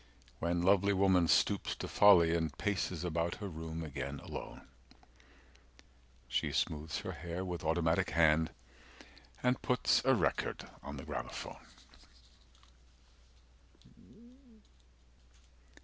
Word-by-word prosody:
When 85 Hz, +1 st, 0 dB
lovely 100 Hz, +2 st, +4 dB
woman 95 Hz, -3 st, +3 dB
stoops -, -, +2 dB
to -, -, -6 dB
folly 85 Hz, -5 st, +6 dB
and 80 Hz, -3 st, -2 dB
Paces 95 Hz, -4 st, -2 dB
about 85 Hz, 0 st, -1 dB
her 105 Hz, -, -6 dB
room 80 Hz, -1 st, -6 dB
again, 70 Hz, -2 st, -5 dB
alone, -, -, -8 dB, 1.6 s
She 60 Hz, -, -1 dB
smoothes 80 Hz, +1 st, -2 dB
her -, -, -5 dB
hair 90 Hz, +2 st, -5 dB
with 90 Hz, -3 st, -5 dB
automatic 80 Hz, +3 st, +1 dB
hand, 80 Hz, -1 st, +4 dB, 0.9 s
255 -, -, -6 dB
And 125 Hz, 0 st, +2 dB
puts 125 Hz, -2 st, +2 dB
a 135 Hz, 0 st, +4 dB
record 90 Hz, -8 st, -1 dB
on 70 Hz, 0 st, -7 dB
the 70 Hz, -, -7 dB
gramophone. 75 Hz, -6 st, -6 dB
85 Hz, 105 wpm, -33 LUFS, 80-95 Hz, 1.6 s, folly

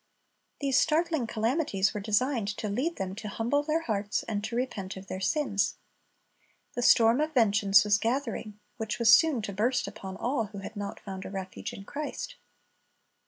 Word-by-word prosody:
These 275 Hz, -2 st, +3 dB
startling 320 Hz, -5 st, +1 dB
calamities 225 Hz, -, 0 dB
were 210 Hz, -, -3 dB
designed 225 Hz, +2 st, +1 dB
to 215 Hz, -, -3 dB
lead 265 Hz, +12 st, -1 dB
them 190 Hz, -1 st, -4 dB
to 215 Hz, -, -6 dB
humble 230 Hz, +7 st, 0 dB
their 310 Hz, +2 st, 0 dB
hearts, 210 Hz, -6 st, -1 dB
and 205 Hz, -2 st, -3 dB
to 225 Hz, +2 st, -4 dB
repent 210 Hz, -7 st, -3 dB
of 190 Hz, -, -9 dB
their 185 Hz, -, -5 dB
sins. 205 Hz, -1 st, 0 dB, 1.0 s
The 245 Hz, -, -2 dB
storm 235 Hz, +2 st, +5 dB
of 310 Hz, 0 st, -2 dB
vengeance 205 Hz, -3 st, +5 dB
was 205 Hz, 0 st, +3 dB
gathering, 230 Hz, -3 st, -2 dB, 0.2 s
which 220 Hz, -1 st, -3 dB
was 230 Hz, -2 st, +6 dB
soon 305 Hz, -9 st, +5 dB
to 200 Hz, -, -4 dB
burst 235 Hz, +6 st, +1 dB
upon 190 Hz, -3 st, -7 dB
all 245 Hz, -2 st, 0 dB
who 205 Hz, 0 st, -10 dB
had 195 Hz, +3 st, -7 dB
not 205 Hz, -1 st, -5 dB
found 190 Hz, -1 st, -7 dB
a -, -, -7 dB
refuge 190 Hz, -1 st, -6 dB
in 195 Hz, -, -9 dB
Christ. 300 Hz, -, -5 dB
220 Hz, 175 wpm, -29 LUFS, 200-265 Hz, 1.0 s, was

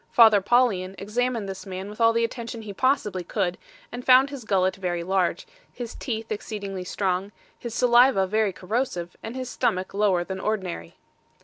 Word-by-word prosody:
Father 220 Hz, -4 st, +7 dB
Paulian 200 Hz, -4 st, +2 dB
examined 230 Hz, +1 st, -1 dB
this 195 Hz, +1 st, -7 dB
man 190 Hz, +1 st, -5 dB
with 210 Hz, +3 st, -8 dB
all 230 Hz, 0 st, +6 dB
the 230 Hz, 0 st, +1 dB
attention 230 Hz, -1 st, -4 dB
he 205 Hz, -2 st, -7 dB
possibly 210 Hz, -6 st, 0 dB
could, 180 Hz, 0 st, -2 dB, 0.3 s
and 245 Hz, +1 st, -6 dB
found 260 Hz, +2 st, +6 dB
his 270 Hz, -5 st, -8 dB
gullet 190 Hz, -2 st, +2 dB
very 175 Hz, -2 st, -2 dB
large, 185 Hz, 0 st, 0 dB, 0.3 s
his 240 Hz, -2 st, -7 dB
teeth 225 Hz, -3 st, -5 dB
exceedingly 200 Hz, -3 st, -4 dB
strong, 190 Hz, +1 st, -2 dB, 0.3 s
his 235 Hz, -2 st, -6 dB
saliva 240 Hz, -4 st, +5 dB
very 215 Hz, +1 st, +1 dB
corrosive, 185 Hz, -3 st, -3 dB
and 225 Hz, +3 st, -7 dB
his 260 Hz, -1 st, -4 dB
stomach 210 Hz, -8 st, -1 dB
lower 195 Hz, -3 st, +2 dB
than 190 Hz, +1 st, -6 dB
ordinary. 185 Hz, -, -3 dB
210 Hz, 170 wpm, -25 LUFS, 190-235 Hz, 0.3 s, Father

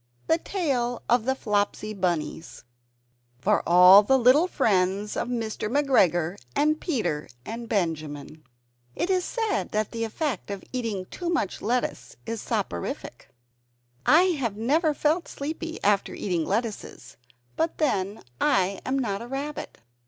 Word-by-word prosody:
THE 325 Hz, -, +2 dB
TALE 265 Hz, -11 st, -1 dB
OF 240 Hz, -1 st, +3 dB
THE 265 Hz, +1 st, +1 dB
FLOPSY 210 Hz, -2 st, -1 dB
BUNNIES 175 Hz, -4 st, -3 dB, 0.7 s
[For 125 Hz, -, +2 dB
All 180 Hz, +3 st, +9 dB
Little 265 Hz, -, +4 dB
Friends 200 Hz, -, +1 dB
of -, -, -2 dB
Mr. 225 Hz, -3 st, -3 dB
McGregor 195 Hz, -, +2 dB, 0.2 s
and 305 Hz, +1 st, +2 dB
Peter 175 Hz, -, -2 dB, 0.2 s
and 230 Hz, +1 st, -6 dB
Benjamin] 155 Hz, -6 st, -3 dB, 0.5 s
It 370 Hz, -, -1 dB
is 365 Hz, -1 st, +2 dB
said 445 Hz, -1 st, -1 dB
that 215 Hz, 0 st, 0 dB
the 230 Hz, 0 st, -3 dB
effect 230 Hz, -, -3 dB
of 200 Hz, -1 st, -5 dB
eating 225 Hz, -7 st, -2 dB
too 350 Hz, -2 st, -4 dB
much 330 Hz, -, -1 dB
lettuce 245 Hz, +3 st, -2 dB
is 225 Hz, -1 st, -4 dB
"soporific." 195 Hz, -, -4 dB, 0.7 s
I 325 Hz, +4 st, +6 dB, 0.2 s
have 225 Hz, -5 st, -2 dB
never 300 Hz, +7 st, +2 dB
felt 315 Hz, +5 st, +1 dB
sleepy 320 Hz, +3 st, -5 dB
after 200 Hz, -1 st, +2 dB
eating 175 Hz, -5 st, -1 dB
lettuces; 220 Hz, +1 st, -4 dB, 0.4 s
but 325 Hz, +1 st, -1 dB
then 205 Hz, -, -1 dB, 0.2 s
I 190 Hz, 0 st, +2 dB
am 265 Hz, +1 st, -1 dB
not 210 Hz, -6 st, -2 dB
a 235 Hz, -, -7 dB
rabbit. 280 Hz, +3 st, -5 dB
225 Hz, 135 wpm, -26 LUFS, 195-285 Hz, 0.7 s, All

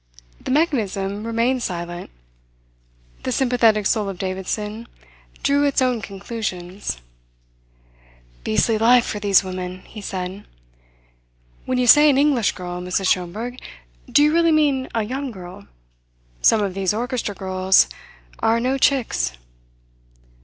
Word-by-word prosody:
The -, -, -6 dB
mechanism 215 Hz, -, 0 dB
remained 235 Hz, +3 st, 0 dB
silent. 175 Hz, -3 st, -5 dB, 1.1 s
The 255 Hz, -, -3 dB
sympathetic 235 Hz, -5 st, +2 dB
soul 210 Hz, 0 st, +1 dB
of 195 Hz, -, -6 dB
Davidson 210 Hz, +4 st, -4 dB, 0.6 s
drew 285 Hz, +1 st, +3 dB
its 285 Hz, -1 st, +2 dB
own 250 Hz, -3 st, +1 dB
conclusions. 195 Hz, -, -5 dB, 1.5 s
"Beastly 215 Hz, -, +1 dB
life 240 Hz, +2 st, +5 dB
for 210 Hz, -, -4 dB
these 200 Hz, -2 st, +4 dB
women!" 185 Hz, 0 st, -6 dB
he 215 Hz, -, -11 dB
said. 190 Hz, 0 st, -5 dB, 1.2 s
"When 255 Hz, -, 0 dB
you 250 Hz, -, +2 dB
say 295 Hz, +5 st, +8 dB
an 270 Hz, -, +3 dB
English 275 Hz, -6 st, +2 dB
girl, 180 Hz, -1 st, -6 dB
Mrs. 185 Hz, +1 st, 0 dB
Schomberg, 215 Hz, +8 st, -2 dB, 0.5 s
do 290 Hz, -, +5 dB
you 300 Hz, +1 st, +3 dB
really 335 Hz, 0 st, +4 dB
mean 285 Hz, -4 st, +2 dB
a 225 Hz, -, +1 dB
young 265 Hz, +5 st, -4 dB
girl? 180 Hz, -, -11 dB, 0.7 s
Some 215 Hz, -2 st, +4 dB
of 195 Hz, -2 st, -2 dB
these 195 Hz, +1 st, 0 dB
orchestra 240 Hz, -3 st, -3 dB
girls 190 Hz, 0 st, +3 dB, 0.5 s
are 225 Hz, +1 st, +2 dB
no 260 Hz, +3 st, 0 dB
chicks." 225 Hz, -, +1 dB
215 Hz, 125 wpm, -21 LUFS, 190-255 Hz, 1.5 s, say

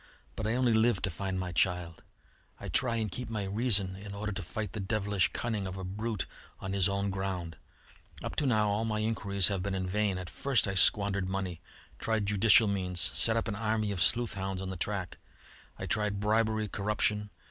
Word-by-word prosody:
But 110 Hz, -, -3 dB
I 110 Hz, -, +1 dB
only 125 Hz, -2 st, +3 dB
live 110 Hz, -2 st, +3 dB
to 100 Hz, -, 0 dB
find 95 Hz, +2 st, -3 dB
my 90 Hz, -1 st, -3 dB
child. 90 Hz, -1 st, 0 dB, 0.6 s
I -, -, -6 dB
try 120 Hz, -3 st, +2 dB
and 110 Hz, -3 st, -2 dB
keep 125 Hz, +5 st, -4 dB
my 110 Hz, -3 st, -2 dB
reason 100 Hz, -2 st, +1 dB
in 100 Hz, +1 st, -8 dB
order 105 Hz, +1 st, -3 dB
to 100 Hz, 0 st, -4 dB
fight 105 Hz, +3 st, -5 dB
the -, -, -4 dB
devilish 100 Hz, -1 st, 0 dB
cunning 110 Hz, -5 st, -2 dB
of 95 Hz, +1 st, -6 dB
a 95 Hz, -, -5 dB
brute 100 Hz, -1 st, -3 dB, 0.3 s
on 95 Hz, 0 st, -4 dB
his 100 Hz, -1 st, +3 dB
own 100 Hz, 0 st, -1 dB
ground. 95 Hz, -4 st, -3 dB, 0.7 s
Up -, -, -4 dB
to 145 Hz, -, +2 dB
now 110 Hz, -4 st, +3 dB
all 105 Hz, +2 st, 0 dB
my 110 Hz, -1 st, -1 dB
inquiries 100 Hz, -3 st, +2 dB
have 100 Hz, -2 st, -1 dB
been 100 Hz, +1 st, -2 dB
in 95 Hz, -1 st, -2 dB
vain. 100 Hz, 0 st, 0 dB
At 90 Hz, -1 st, -6 dB
first 130 Hz, +3 st, +1 dB
I 95 Hz, -, -1 dB
squandered 100 Hz, 0 st, +3 dB
money, 95 Hz, -3 st, -3 dB, 0.4 s
tried 110 Hz, -2 st, 0 dB
judicial 105 Hz, +2 st, +6 dB
means, 90 Hz, -3 st, 0 dB
set 115 Hz, 0 st, +4 dB
an 110 Hz, -, -2 dB
army 110 Hz, -1 st, 0 dB
of 95 Hz, -3 st, -3 dB
sleuth 120 Hz, +6 st, +3 dB
hounds 95 Hz, -1 st, -3 dB
on 95 Hz, 0 st, -4 dB
the -, -, -5 dB
track. 90 Hz, 0 st, -3 dB, 0.6 s
I -, -, -5 dB
tried 105 Hz, -2 st, -1 dB
bribery, 110 Hz, +1 st, +1 dB
corruption. 105 Hz, 0 st, -1 dB
100 Hz, 200 wpm, -30 LUFS, 95-110 Hz, 0.7 s, judicial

